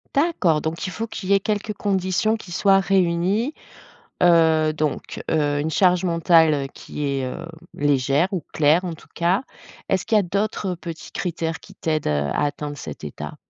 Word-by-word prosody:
D'accord 275 - +2
donc 160 +4 -3
il - - -3
faut 225 - -3
qu'il 195 -4 -7
y - - +5
ait 195 - +5
quelques 210 +1 -2
conditions 200 +2 0
qui 190 -5 -10
soient 195 +2 +4
réunies, 195 - +1 0.7
heu, 160 -3 +4
donc 150 -2 -3
heu, 145 -2 +1
une 160 +2 -1
charge 180 +1 +3
mentale 165 -4 +3
qui 150 -1 -5
est, 135 -1 -1
heu, 165 +6 -5 0.3
légère 140 +3 +2
ou 185 -4 -2
claire 160 +4 +3
en 175 - -3
tout 160 - -13
cas. 180 +7 +1 0.5
Est-ce 190 -1 +1
qu'il 220 - +2
y - - +7
a - - +3
d'autres 200 0 -1
petits 170 -1 -8
critères 165 -2 -3
qui - - -15
t'aident, 155 -2 -2
heu, 70 -1 0
à - - +1
atteindre 145 0 -4
cet 75 - -8
état? 75 - -7
170 Hz, 180 wpm, -22 LUFS, 155-195 Hz, 0.7 s, y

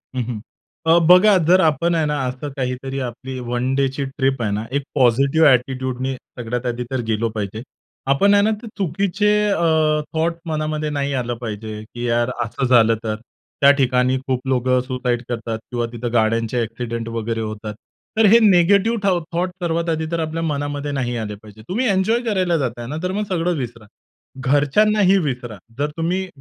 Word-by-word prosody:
हं, 125 - 0
हं. 115 -2 -5 0.5
अ, 165 +1 +5
बघा 190 +3 +7
जर 185 +2 +6
आपण 165 +2 +2
आहे 160 -2 +1
ना, 150 -1 -1
असं 130 +3 -5
काहीतरी 130 +1 -3
आपली 130 +2 -7
वन 125 +2 0
डेची 135 0 0
ट्रिप 135 -1 -1
आहे 110 -3 0
ना, 105 +2 -2
एक 140 +1 -1
पॉझिटिव्ह 140 +4 +4
ऍटिट्यूड 130 0 -2
ने 135 +1 -1 0.3
सगळ्यात 120 +1 -3
आधी 120 0 -2
तर 130 -2 -1
गेलो 115 +1 0
पाहिजे. 110 0 -5 0.5
आपण 200 +9 +4
आहे 200 0 +5
ना, 215 - +3
ते 235 - -9
चुकीचे 200 +2 0 0.2
अ, 195 - 0 0.5
थॉट्स 165 +1 0
मनामध्ये 155 0 -2
नाही 140 -1 -2
आलं 120 -2 -1
पाहिजे. 110 -1 -6
की 120 +2 -7
यार 120 +1 +1 0.2
असं 125 +4 -3
झालं, 115 -3 +5
तर 110 -1 -2 0.5
त्या 140 0 +8
ठिकाणी 130 0 +2
खूप 130 0 -2
लोकं 130 -1 +2
सुसाईड 125 -2 -1
करतात. 115 -2 -3
किंवा 120 -1 -1
तिथं 120 0 -5
गाड्यांचे 115 +1 +1
ऍक्सिडेंट 115 0 -5
वगैरे 115 0 -3
होतात. 110 0 -5 0.4
तर 220 - +5
हे 220 +3 +7
निगेटिव्ह 200 +3 +4
थाउट् 180 -4 +2
थॉट्स 180 +2 -1
सर्वात 170 0 0
आधी 160 -1 -1
तर 170 - -1
आपल्या 160 +1 -2
मनामध्ये 145 -1 -2
नाही 125 -3 -2
आले 105 -2 -4
पाहिजे. 105 +1 -15
तुम्ही 230 +8 0
एन्जॉय 200 +5 +2
करायला 185 -6 +1
जाता 125 -5 -3
आहे 120 - -7
ना, 150 - -4
तर 180 - -1
मग 205 +2 -1
सगळं 175 -1 0
विसरा. 120 -4 -6 0.6
घरच्यांनाही 190 +9 +3
विसरा 125 - -3 0.2
जर 145 +1 0
तुम्ही 180 +3 -1
135 Hz, 180 wpm, -20 LUFS, 120-165 Hz, 0.6 s, त्या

